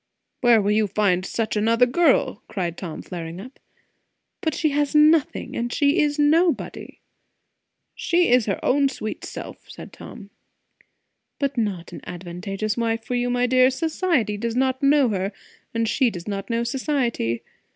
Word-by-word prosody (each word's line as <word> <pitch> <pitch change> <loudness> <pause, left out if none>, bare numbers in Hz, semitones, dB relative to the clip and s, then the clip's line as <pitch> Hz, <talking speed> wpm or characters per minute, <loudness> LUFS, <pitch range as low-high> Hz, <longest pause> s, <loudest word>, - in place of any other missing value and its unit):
"Where 240 -2 +5
will 205 - +1
you 215 0 +2
find 195 -2 +1
such 220 +3 -2
another 230 +3 +3
girl?" 260 -4 +2
cried 175 -4 -3
Tom, 170 -4 -7
flaring 170 -1 -7
up. 255 +7 -11 0.8
"But 315 -2 -1
she 310 - +1
has 290 +1 0
nothing, 305 0 +3
and 235 0 -2
she 285 +6 +2
is 295 0 0
nobody." 320 +3 +1 0.9
"She 345 +1 +1
is 245 -3 +4
her 195 - -1
own 275 +1 +3
sweet 215 -5 -6
self," - - -9
said - - -11
Tom. 205 -4 -11 1.1
"But 280 -1 -1
not 205 -7 -3
an - - -8
advantageous 190 +4 -4
wife 230 -1 -1
for 250 - -4
you, 245 0 0
my 245 0 +1
dear. 255 +1 +4
Society 295 - 0
does 230 +2 -3
not 260 +1 +1
know 280 -2 +4
her, 195 -1 -2 0.4
and 230 0 -1
she 260 +2 +2
does 175 -4 -8
not 200 +1 -4
know 230 0 0
society. 240 - -1
235 Hz, 160 wpm, -23 LUFS, 205-280 Hz, 1.1 s, Where